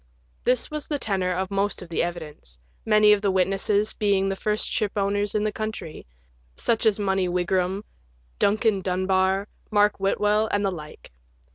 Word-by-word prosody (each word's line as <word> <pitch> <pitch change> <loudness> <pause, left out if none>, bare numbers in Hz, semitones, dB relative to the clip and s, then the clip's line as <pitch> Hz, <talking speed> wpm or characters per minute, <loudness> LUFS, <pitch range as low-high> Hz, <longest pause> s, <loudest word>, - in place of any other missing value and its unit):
This 250 +3 +1
was 300 -1 -4
the 295 - -1
tenor 190 -7 -1
of 185 +2 -2
most 200 -1 -1
of 175 - -13
the 165 - 0
evidence, 155 - -5 0.3
many 215 -1 +6
of 205 - +1
the 200 - +1
witnesses 195 +3 +1
being 200 -2 +1
the 195 - -1
first 210 +2 -1
shipowners 205 -1 -1
in 210 - +1
the 215 - 0
country 215 - -6 0.2
— - - -36
such 230 -1 +1
as 210 - +3
Money 190 -3 0
Wigram, 180 +2 0 0.6
Duncan 210 0 +2
Dunbar, 190 +1 +1 0.2
Mark 205 -1 +3
Whitwell, 210 +2 +2
and 205 0 +1
the 195 - +1
like. 155 - -10
195 Hz, 165 wpm, -25 LUFS, 185-210 Hz, 0.6 s, many